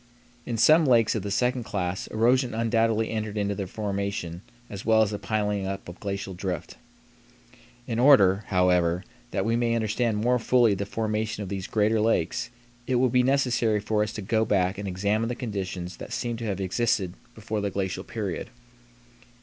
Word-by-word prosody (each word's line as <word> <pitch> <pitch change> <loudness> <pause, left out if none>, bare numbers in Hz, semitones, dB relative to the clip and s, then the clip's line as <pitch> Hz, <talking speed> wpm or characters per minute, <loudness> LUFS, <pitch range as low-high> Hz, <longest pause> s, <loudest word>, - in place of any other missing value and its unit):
In 115 - -2
some 155 +8 +6
lakes 115 -5 +4
of 110 - -2
the 100 - -4
second 125 +4 0
class 95 -4 -3
erosion 120 +2 +2
undoubtedly 115 -1 +1
entered 110 -1 -3
into 100 -1 0
their 100 -1 -4
formation 100 -4 -3 0.3
as 100 -1 -7
well 110 0 +4
as 105 - -2
the 105 - -4
piling 105 -2 -1
up 95 0 -5
of 90 0 -10
glacial 100 -1 -4
drift. 90 -2 -4 1.1
In 115 -2 -2
order, 105 -7 +6
however, 90 -1 +2 0.3
that - - -1
we 115 +1 +1
may 120 -1 +1
understand 110 0 0
more 125 +3 +2
fully 120 -2 +4
the 100 +1 -3
formation 110 0 -2
of 95 - -7
these 95 -1 -4
greater 110 +1 +2
lakes 115 +2 0 0.4
it 130 - +1
will 125 +1 +3
be 125 +1 +3
necessary 125 -5 +2
for 105 +1 0
us 105 0 -1
to 105 - -5
go 110 +3 +1
back 95 -2 +1
and 100 - -4
examine 100 +5 0
the 120 - -2
conditions 95 -7 -5
that - - -9
seem 120 -1 -2
to 115 - -5
have 100 -3 -2
existed 95 -1 0 0.2
before 110 -1 -3
the 100 - -1
glacial 95 -1 -3
period. 100 -7 -4
105 Hz, 180 wpm, -26 LUFS, 95-115 Hz, 1.1 s, some